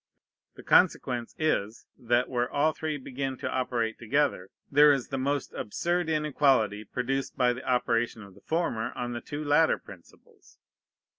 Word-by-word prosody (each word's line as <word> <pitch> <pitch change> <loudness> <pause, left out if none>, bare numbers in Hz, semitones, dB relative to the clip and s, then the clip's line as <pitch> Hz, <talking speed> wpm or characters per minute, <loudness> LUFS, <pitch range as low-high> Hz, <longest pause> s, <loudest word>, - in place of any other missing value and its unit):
The - - -12
consequence 120 -2 +2
is, 115 -9 -1
that, 120 +1 +1
where 120 -1 -1
all 150 +2 +2
three 155 -1 -3
begin 135 0 -4
to - - -4
operate 120 -3 -1
together, 120 -6 0 0.2
there 145 +1 +7
is 135 -4 -1
the 135 - -3
most 140 +1 -2
absurd 175 +9 -2
inequality 135 -9 +2
produced 130 +5 -3
by 125 -1 +3
the 125 - -8
operation 120 -3 0
of 100 -1 -14
the 100 - -19
former 155 -9 -1
on 120 0 -4
the 120 - -5
two 150 +1 -6
latter 150 +2 +4
principles. 90 -3 -17
130 Hz, 155 wpm, -28 LUFS, 120-145 Hz, 0.2 s, there